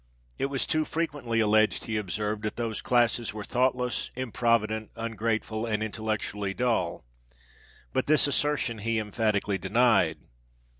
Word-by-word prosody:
It 135 - +1
was 140 -1 -1
too 155 0 +1
frequently 145 -8 -1
alleged, 110 0 +3
he 110 - -3
observed, 105 +1 -2
that 105 -1 -3
those 115 -2 -3
classes 120 -2 +1
were 105 - -5
thoughtless, 125 +1 0
improvident, 115 -3 0
ungrateful, 115 0 -2
and 110 -1 0
intellectually 105 -2 -3
dull; 120 - 0 0.9
but - - 0
this 155 +1 +5
assertion 145 -5 +1
he 115 +2 0
emphatically 105 -2 0
denied. 100 -5 +3
110 Hz, 130 wpm, -28 LUFS, 105-125 Hz, 0.9 s, this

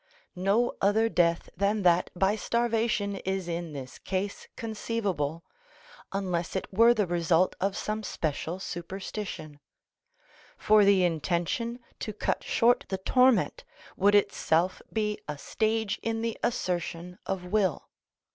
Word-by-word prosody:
No 200 +6 +2
other 220 +3 +3
death 170 -4 +2
than 200 +2 +1
that 175 0 +4
by 195 +3 +2
starvation 225 -3 0
is 190 -1 -3
in 170 -1 -3
this 130 -3 -8
case 195 +1 -3
conceivable 200 -8 -2 0.7
(unless 185 -3 -2
it 190 - -1
were 230 +4 +6
the 210 -3 +2
result 175 0 +2
of 195 +1 0
some 215 +1 -2
special 165 -2 -3
superstition); 175 -4 -6 1.0
for 215 0 +5
the 195 -2 +5
intention 175 - -1 0.2
to 215 - -4
cut 210 - -1
short 240 +1 +3
the 190 - -1
torment 250 +2 +3 0.3
would 200 +2 +4
itself 185 -3 +2
be 210 -1 -1
a 150 -1 -4
stage 220 +5 -1
in 225 0 -2
the 230 -1 -1
assertion 180 -5 -2
of 190 -2 -2
will. 190 -3 0
195 Hz, 130 wpm, -28 LUFS, 175-220 Hz, 1.0 s, were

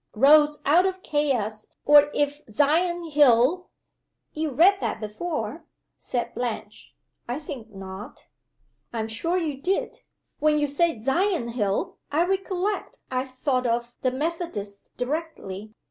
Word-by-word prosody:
Rose 295 +5 +6
out 345 +6 +5
of 375 0 -4
Chaos 245 -8 -1 0.2
or 295 0 +7
if 290 0 -1
Sion 330 +6 +1
hill 290 +5 +4 0.3
" - - -53
"You 310 0 -2
read 355 +9 +5
that - - -2
before," 225 +11 -4 0.3
said 240 -1 -3
Blanche. 245 -2 -5 0.3
"I 245 - -1
think 265 -7 -8
not." 195 +6 -9 0.7
"I'm 225 -2 -2
sure 330 +11 -1
you 300 -6 -2
did. 375 +5 -1 0.4
When 305 0 +3
you 295 - +2
said 285 -4 0
'Sion 325 - +1
hill' 210 -5 -1
I 320 +4 +3
recollect 385 +1 -2
I 255 0 0
thought 255 -1 -1
of 235 +1 -1
the 255 - +2
Methodists 260 - -4
directly. 245 - -4
290 Hz, 130 wpm, -25 LUFS, 235-330 Hz, 0.7 s, or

